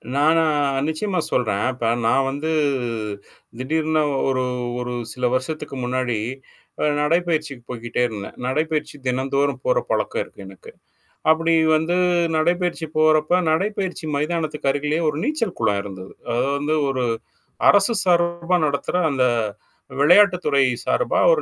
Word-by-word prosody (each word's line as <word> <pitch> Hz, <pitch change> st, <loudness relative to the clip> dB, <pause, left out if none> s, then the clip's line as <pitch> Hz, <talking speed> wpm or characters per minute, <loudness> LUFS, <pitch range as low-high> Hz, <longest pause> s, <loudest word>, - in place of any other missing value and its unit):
நானா 160 Hz, +3 st, +4 dB, 0.4 s
நிச்சயமா 185 Hz, +5 st, -1 dB
சொல்றேன். 105 Hz, -5 st, 0 dB
இப்ப 120 Hz, -2 st, -1 dB, 0.2 s
நான் 135 Hz, +4 st, +3 dB
வந்து 145 Hz, +4 st, -3 dB, 1.1 s
திடீர்னு 155 Hz, +3 st, 0 dB, 0.3 s
ஒரு 130 Hz, -1 st, 0 dB, 0.4 s
ஒரு 125 Hz, 0 st, -4 dB, 0.2 s
சில 125 Hz, -1 st, -2 dB
வருஷத்துக்கு 150 Hz, +2 st, -4 dB
முன்னாடி 125 Hz, -1 st, -1 dB, 0.7 s
அ -, -, +3 dB, 0.2 s
நடைப்பயிற்சிக்கு 155 Hz, -4 st, 0 dB
போய்கிட்டே 120 Hz, 0 st, -3 dB
இருந்தேன். 105 Hz, -4 st, -8 dB
நடைப்பயிற்சி 150 Hz, +3 st, -1 dB
தினந்தோறும் 135 Hz, +2 st, 0 dB
போற -, -, +2 dB
பழக்கம் 475 Hz, -, 0 dB
இருக்கு 475 Hz, -, -14 dB
எனக்கு. 465 Hz, -1 st, -13 dB, 0.6 s
அப்படி 165 Hz, +1 st, +3 dB, 0.2 s
வந்து 160 Hz, +3 st, 0 dB, 0.4 s
நடைப்பயிற்சி 175 Hz, +1 st, 0 dB
போறப்ப 155 Hz, +2 st, +4 dB
நடைப்பயிற்சி 190 Hz, 0 st, -1 dB
மைதானத்துக்கு 150 Hz, -1 st, -1 dB
அருகிலேயே 150 Hz, +3 st, -1 dB
ஒரு 150 Hz, -, -3 dB
நீச்சல் 265 Hz, -, -2 dB
குளம் 105 Hz, -3 st, +1 dB
இருந்தது. 95 Hz, -2 st, -9 dB, 0.2 s
அது 120 Hz, -, +1 dB
வந்து 150 Hz, +2 st, 0 dB
ஒரு 130 Hz, -2 st, -1 dB, 0.7 s
அரசு 205 Hz, +3 st, +5 dB
சார்பா 170 Hz, 0 st, +2 dB
நடத்துற 140 Hz, +4 st, -2 dB
அந்த 135 Hz, -3 st, +1 dB, 0.8 s
விளையாட்டு 180 Hz, +6 st, +6 dB
துறை 140 Hz, -2 st, +3 dB, 0.2 s
சார்பா -, -, +1 dB
ஒரு 485 Hz, -3 st, +3 dB
155 Hz, 125 wpm, -22 LUFS, 130-170 Hz, 1.1 s, விளையாட்டு